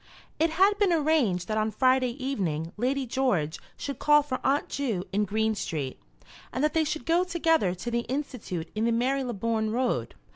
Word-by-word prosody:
It 325 +1 +3
had 385 +5 +3
been 400 -3 +3
arranged 290 - +2
that 215 0 0
on 215 0 +1
Friday 255 +1 +2
evening 180 - -2
Lady 260 +4 0
George 215 - 0 0.2
should 280 - -5
call 295 0 +5
for 260 -3 -3
Aunt 280 +2 +2
Ju 230 -10 -2
in 210 +1 +2
Green 220 +2 +1
Street, 150 -10 -4 0.5
and 260 - -2
that 305 - +2
they 320 - +3
should 310 +1 -3
go 335 +2 +3
together 325 - +1
to 235 +7 -5
the 235 - +1
Institute 250 - -4
in 215 +1 0
the 235 - +2
Marylebone 230 -3 0
Road. 225 - -1
250 Hz, 180 wpm, -27 LUFS, 210-295 Hz, 0.5 s, call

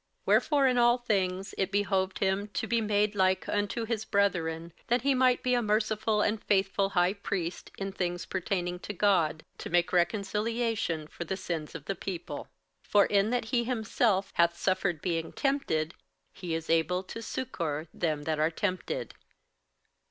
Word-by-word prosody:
58:002:017 - - -45
Wherefore 285 -3 +4
in 250 -1 +2
all 240 0 +5
things 195 -5 -1
it 195 0 0
behoved 195 -2 +1
him 195 +1 0
to 210 - -3
be 230 +1 +1
made 210 -1 +1
like 190 -1 +2
unto 205 +3 -1
his 220 -1 -2
brethren, 170 -5 0
that 240 0 +2
he 280 0 +3
might 255 -1 +3
be 250 - +2
a 245 - +3
merciful 215 0 +1
and 210 0 0
faithful 195 0 +2
high 175 +2 +4
priest 185 -4 -4
in 195 0 -3
things 175 -2 -2
pertaining 180 -1 -2
to 205 - -6
God, 175 -6 +2
to - - -6
make 175 +1 +2
reconciliation 210 0 0
for 165 - -7
the 190 +2 -3
sins 165 -5 -4
of 150 -3 -7
the 195 - -1
people. 180 -2 -5 0.4
58:002:018 - - -27
For 205 -1 +6
in 200 +1 +2
that 245 -1 0
he 235 +2 +1
himself 220 -4 +1
hath 170 0 +3
suffered 180 -3 0
being 165 -3 -1
tempted, 230 - 0 0.4
he 175 -3 -4
is 165 0 -4
able 180 +3 +2
to 230 +4 -7
succour 170 - -3
them 155 -4 -1
that 155 0 -1
are 155 +1 +3
tempted. 185 +2 -3
195 Hz, 175 wpm, -29 LUFS, 175-220 Hz, 0.4 s, For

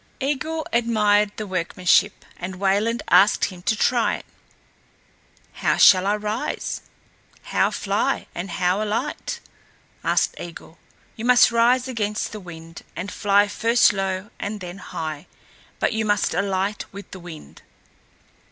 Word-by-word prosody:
Eigil 305 +3 -2
admired 210 -3 +3
the 215 - -4
workmanship 185 +1 +1
and 185 +1 -6
Wayland 200 +5 +1
asked 205 +2 +5
him 180 -3 -8
to 220 - +1
try 235 +1 +2
it. - - -10 1.3
"How - - 0
shall 185 0 +7
I 205 - +2
rise, 210 +2 -3 0.6
how - - +1
fly, - - -1
and 180 +3 -5
how 180 +3 0
alight?" 225 +7 -3 0.6
asked - - +2
Eigil. 170 -1 -10 0.4
"You 225 - -6
must 245 -1 +6
rise 240 +2 +3
against 215 -4 -2
the 215 - -7
wind, 165 -3 -11
and 185 +4 -5
fly 205 0 +3
first 230 +2 +3
low 195 +1 -3
and 210 +1 -4
then 180 0 -8
high, 160 -3 -6 0.5
but - - 0
you 220 0 0
must 205 -1 +1
alight 200 +1 -1
with 200 0 -10
the 185 - -8
wind." 160 - -11
205 Hz, 135 wpm, -23 LUFS, 185-225 Hz, 1.3 s, shall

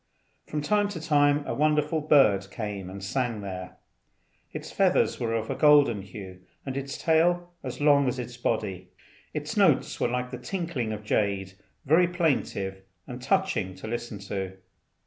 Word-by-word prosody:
From 150 -1 -3
time 205 +4 +2
to 195 -5 -5
time 145 -2 +3
a - - -2
wonderful 150 +1 +1
bird 110 -11 +4
came 100 -4 -5
and 95 +1 -8
sang 120 0 -1
there. 95 -2 -7 0.7
Its - - -7
feathers - - +2
were 115 -1 -1
of 110 -1 -2
a - - -2
golden 145 -8 +5
hue, 95 -1 -10 0.3
and 135 -1 -4
its 140 0 -4
tail 175 +2 +2
as 130 -2 -6
long 145 -2 +4
as 125 - -1
its 125 -1 -6
body. 100 -6 -2 0.4
Its - - -4
notes - - +3
were - - +2
like 125 +1 -2
the 125 - -6
tinkling 145 - -3
of 105 0 -5
jade, 100 -3 0 0.3
very 165 +5 +5
plaintive 135 - -1 0.2
and 125 0 -8
touching 160 - 0
to 95 - -10
listen 120 -1 -4
to. 95 -1 -5
125 Hz, 165 wpm, -27 LUFS, 100-150 Hz, 0.7 s, golden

